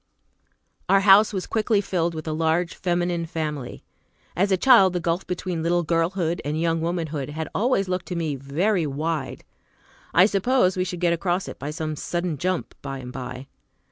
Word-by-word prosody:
Our 195 0 +5
house 200 +2 +6
was 190 -3 -3
quickly 220 -1 +1
filled 175 -4 -1
with 155 0 -6
a 155 - -1
large 165 +2 0
feminine 175 -1 -1
family. 150 -6 -4 0.5
As 195 +3 +1
a 190 - +4
child, 195 -5 +6
the 180 - 0
gulf 170 +2 -2
between 180 -2 -3
little 175 +1 +1
girlhood 170 +1 0
and 150 +2 -2
young 165 0 0
womanhood 160 -5 -2
had 160 +2 -4
always 210 -3 +1
looked 180 0 -3
to 180 - -4
me 160 -4 -1
very 160 +7 0
wide. 150 0 -3 0.7
I 180 - +6
suppose 200 -1 +2
we 185 0 0
should 180 -1 -5
get 170 -1 +3
across 175 +2 -1
it - - -8
by 140 - -4
some 155 0 -4
sudden 170 -1 -3
jump, 185 +2 -2
by 135 -1 -5
and 125 -1 -8
by. 130 0 -6
170 Hz, 180 wpm, -24 LUFS, 155-185 Hz, 0.7 s, house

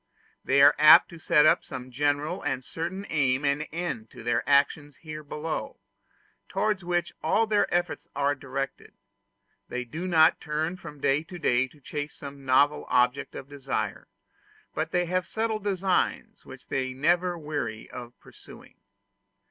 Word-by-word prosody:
They 140 +1 +4
are 145 +1 +8
apt 150 0 +8
to 170 - -11
set 160 -2 +4
up - - +4
some 130 -1 -8
general 145 +6 0
and 135 -3 -3
certain 180 +4 -5
aim 135 -2 +1
and 140 +2 0
end 160 -10 -4
to - - -12
their 120 0 +1
actions 145 +1 +2
here 155 -1 -8
below, 150 +2 -5 0.7
towards 210 -4 0
which 175 0 -1
all 210 +8 +2
their 210 -2 +1
efforts 175 0 -1
are 140 0 +2
directed: 135 0 -6 0.7
they 125 0 -3
do 160 +9 -5
not 160 -3 +4
turn 155 +3 -2
from 150 -5 -11
day 135 +2 +2
to 180 - -9
day 125 -5 +2
to 150 - -21
chase 145 +2 -5
some 140 -1 -10
novel 140 +3 +3
object 125 +3 +1
of 135 - -7
desire, 140 -1 -4 0.7
but - - -2
they 180 0 +1
have 185 +1 -1
settled 220 -1 -2
designs 190 -2 -1
which - - -13
they 130 -1 -1
are - - -15
never 175 +5 +1
weary 145 -8 -4
of 120 -1 -9
pursuing. - - -16
150 Hz, 160 wpm, -27 LUFS, 135-175 Hz, 0.7 s, are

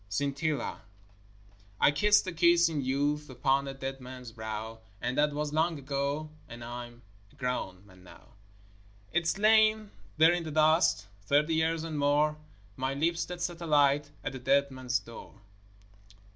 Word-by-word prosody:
SCINTILLA 140 +6 -2 1.0
I - - +5
kissed 210 +9 +3
a 185 - -3
kiss 170 0 +4
in 155 -3 -2
youth 145 +3 -1
Upon 135 +2 0
a 135 - -4
dead 135 0 -6
man's 125 -1 -9
brow; 110 0 -6 0.2
And 125 - -2
that 150 0 +2
was 150 0 -3
long 160 +1 +1
ago, 140 +2 -3 0.2
And 120 0 -9
I'm 120 0 -8 0.3
a - - -23
grown 125 -8 -4
man 95 -2 -18
now. 90 - -16 0.8
It's 170 +2 +1
lain 215 0 +4 0.3
there 160 +2 +6
in 175 - -1
the 160 - -6
dust, 155 - +3 0.2
Thirty 150 +3 +3
years 160 0 +1
and 160 -2 -4
more; 145 +2 +2 0.4
My 130 +2 -2
lips 170 +4 0
that 175 0 -6
set 175 -1 -4
a 170 - -5
light 145 -1 +3
At - - -4
a 130 - -6
dead 140 +2 +2
man's 130 -1 -1
door. 115 0 -11
145 Hz, 160 wpm, -29 LUFS, 130-160 Hz, 1.0 s, there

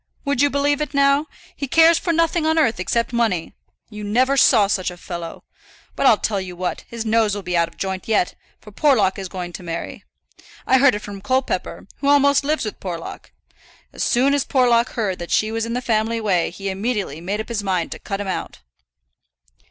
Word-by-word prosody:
Would 280 -2 +1
you 285 - +4
believe 285 +1 +1
it 300 -1 -4
now? 280 +2 +3 0.3
he 280 - -4
cares 325 +4 +5
for 345 - -1
nothing 330 0 +1
on 320 +1 +2
earth 235 - +2
except 230 +6 -1
money. 220 -8 0 0.4
You 210 0 -8
never 255 +6 +2
saw 230 -6 +5
such 195 -2 -1
a 180 - -10
fellow. 170 -2 -7 0.5
But 275 - +2
I'll 220 - +6
tell 205 -2 -1
you 180 -1 -7
what, 180 +1 -4
his 230 -1 -6
nose 220 -2 +2
will 205 - -6
be 180 -1 -2
out 170 -1 +3
of 170 - -18
joint 190 -1 -4
yet, 210 -5 +1 0.3
for 210 - -14
Porlock 205 -6 +2
is 190 -2 -6
going 175 -2 -6
to - - -8
marry. 170 -1 -6 0.6
I 260 - +4
heard 275 -4 +5
it 210 - -6
from 200 -1 -8
Colepepper, 260 +4 -2
who 280 - -2
almost 280 0 +4
lives 300 -2 0
with 215 - -6
Porlock. 175 -3 -7 0.6
As - - -3
soon 265 +4 +2
as 285 -1 +2
Porlock 245 -2 +2
heard 205 -6 -2
that 175 - -6
she 215 0 +1
was 225 0 -2
in 230 - -3
the 250 +1 -2
family 225 0 0
way 190 -6 +1
he 195 +2 -6
immediately 195 - -3
made 200 +4 -3
up 220 - -5
his 230 -3 -2
mind 185 -4 -1
to - - -6
cut 195 -1 -5
him 205 - -4
out." 185 - -5
220 Hz, 215 wpm, -21 LUFS, 190-270 Hz, 0.6 s, I'll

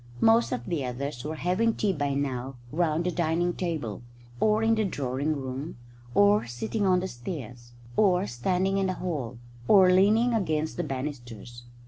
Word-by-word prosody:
Most 225 +1 +4
of 120 -1 -3
the 165 -6 -2
others 125 0 -4
were 155 +2 -4
having 185 +8 +1
tea 205 -2 +1
by 145 -4 -1
now 135 -2 -3 0.2
round 165 0 +1
the 180 - 0
dining 170 0 0
room - - -2
table, 155 - -3 0.4
or 215 +1 +3
in 225 0 +4
the 220 -1 +1
drawing 145 -4 -1
room, 130 +3 -5 0.4
or 205 - +4
sitting 200 - -2
on 180 -1 +3
the 190 - -2
stairs, 120 - -8 0.2
or 190 -2 +3
standing 185 +10 0
in 195 - +1
the 185 - -1
hall, 140 -11 -4 0.3
or 190 -3 +7
leaning 215 +6 +4
against 160 -7 -1
the 175 - -1
banisters. 120 -4 -6
160 Hz, 170 wpm, -27 LUFS, 130-190 Hz, 0.4 s, or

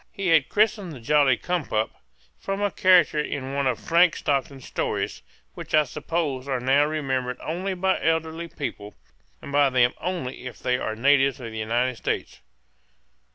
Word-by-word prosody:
He 195 -2 -2
had 160 -5 +5
been - - -31
christened 205 -4 +1
the 135 - -9
jolly 135 0 +3
cum 175 +3 -2
pup, 110 0 -1 0.5
from 195 0 -3
a 205 -1 0
character 180 -5 +4
in 135 -2 -3
one 140 -1 0
of 130 - 0
Frank 170 0 +3
Stockton's 135 -1 -2
stories, - - -3 0.3
which - - -3
I 155 - +6
suppose 145 -1 -3
are 135 -2 -1
now 135 +4 +3
remembered 130 -5 -2
only 185 +4 -3
by 190 +1 0
elderly 165 +1 -1
people, 105 -10 -6 0.5
and - - -8
by 145 -1 +4
them 125 -1 +3
only 165 -8 -4
if 125 - -9
they 125 0 -1
are 110 - -3
natives 135 +3 +3
of 115 -3 -7
the 110 - -6
United 120 +3 0
States. - - -3
145 Hz, 175 wpm, -24 LUFS, 130-165 Hz, 0.5 s, I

